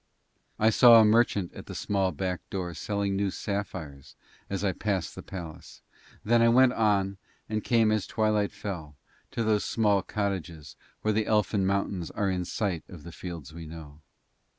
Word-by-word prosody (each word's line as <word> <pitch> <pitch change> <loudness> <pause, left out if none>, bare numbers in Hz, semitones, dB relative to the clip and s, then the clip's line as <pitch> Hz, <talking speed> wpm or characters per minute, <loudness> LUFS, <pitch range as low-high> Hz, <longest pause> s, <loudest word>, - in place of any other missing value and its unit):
I 110 +1 +4
saw 115 0 +8
a 110 - +6
merchant 105 -4 +2
at - - -11
a - - -6
small 95 -2 0
back 90 +3 -3
door 90 -4 -4
selling 100 +2 -2
new 100 0 0
sapphires 95 -9 -5 0.3
as 100 0 -3
I 100 - +2
passed 95 -2 -2
the - - -8
palace, 85 -5 -9 0.4
then 115 +2 +4
I 115 - +5
went 125 +1 +5
on 100 -4 +1 0.3
and 110 0 -2
came 115 -3 +3
as 110 -3 0
twilight 105 -2 +1
fell 80 -7 -6 0.3
to 115 - -2
those 110 -2 +2
small 105 -3 +2
cottages 95 -6 -4 0.3
where 110 - +2
the 110 0 0
elfin 105 -2 +2
mountains 100 -3 -1
are 100 -2 -1
in 90 -1 -2
sight 90 -4 -2
of 85 -5 -11
the 85 - -9
fields 85 -5 -8
we 80 -1 -8
know. 80 -2 -11
100 Hz, 175 wpm, -28 LUFS, 90-110 Hz, 0.4 s, saw